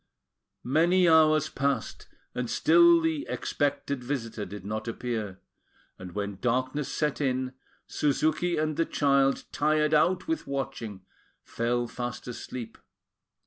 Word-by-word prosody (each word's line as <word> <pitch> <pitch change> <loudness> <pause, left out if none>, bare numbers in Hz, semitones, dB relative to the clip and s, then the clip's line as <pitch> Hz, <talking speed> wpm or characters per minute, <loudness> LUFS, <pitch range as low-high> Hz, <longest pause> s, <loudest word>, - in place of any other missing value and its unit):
Many 175 +7 +3
hours 155 -2 +5
passed, 140 0 -2 0.3
and 125 -1 -3
still 340 +1 +5
the 320 -2 -1
expected 140 -2 -2
visitor 115 -5 -4
did 100 0 -9
not 110 +2 -4
appear; 110 -5 -4 0.6
and 90 -1 -9
when 100 -1 -4
darkness 130 +4 -1
set 150 -1 -1
in, 130 -1 -1 0.3
Suzuki 155 +4 0
and 155 -1 -1
the 165 - +2
child, 140 -1 +2
tired 150 +1 +1
out 180 - +3
with 325 0 -2
watching, 130 -8 -5 0.4
fell 120 +1 -1
fast 120 +1 -6
asleep. 125 -1 -7
140 Hz, 120 wpm, -28 LUFS, 120-155 Hz, 0.6 s, hours